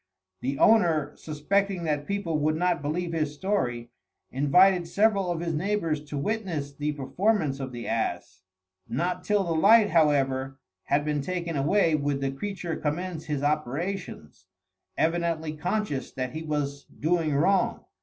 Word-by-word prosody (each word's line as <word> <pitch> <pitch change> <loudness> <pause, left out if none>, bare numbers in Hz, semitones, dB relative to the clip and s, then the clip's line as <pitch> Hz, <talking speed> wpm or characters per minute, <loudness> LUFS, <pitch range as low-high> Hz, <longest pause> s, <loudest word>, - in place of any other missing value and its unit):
The 135 +2 -2
owner, 165 -10 +3
suspecting 185 +5 -1
that 150 -2 -1
people 190 -6 -1
would 155 +1 +1
not 175 -1 +1
believe 165 +4 -2
his 155 -2 -1
story, 120 - -2 0.4
invited 175 +6 +4
several 200 0 +2
of 170 -1 -2
his 170 -1 -2
neighbours 165 -3 -1
to 145 0 -5
witness 165 -5 -2
the 150 +1 -2
performance 150 +1 0
of 135 -1 -5
the 120 -1 -7
ass. 95 -5 -2 0.5
Not 180 +7 -1
till 205 0 +2
the 170 -2 -1
light, 205 +6 +5
however, 135 -4 +2 0.3
had 145 +1 +1
been 150 -1 0
taken 170 +1 -3
away, 160 +5 +2
would 145 -2 0
the 135 -1 -1
creature 175 +2 -4
commence 160 +2 -3
his 145 -2 -2
operations, 150 - -3 0.5
evidently 165 -1 0
conscious 175 - -2
that 130 -1 -3
he 155 - -5
was 145 -2 -3
doing 160 -1 0
wrong. 190 +7 +2
155 Hz, 145 wpm, -27 LUFS, 145-180 Hz, 0.5 s, light